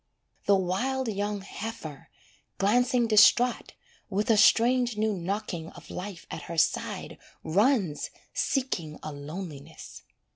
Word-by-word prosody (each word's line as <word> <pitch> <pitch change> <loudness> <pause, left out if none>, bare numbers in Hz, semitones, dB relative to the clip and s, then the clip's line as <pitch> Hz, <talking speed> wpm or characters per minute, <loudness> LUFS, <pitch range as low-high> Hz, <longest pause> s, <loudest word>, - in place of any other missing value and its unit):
The 200 - +6
wild 235 +8 -1
young 205 0 -2
heifer, 195 -7 -7 0.5
glancing 245 +4 +3
distraught, 230 +3 +4 0.4
With 210 +3 +1
a - - +5
strange 235 +2 +4
new 215 0 +1
knocking 180 -2 -4
of - - -13
life 185 -1 -7
at - - -5
her 170 - -5
side - - -1 0.2
Runs 195 - +1 0.2
seeking 175 - -1
a 155 - -5
loneliness. 150 0 -8
205 Hz, 115 wpm, -28 LUFS, 170-235 Hz, 0.5 s, The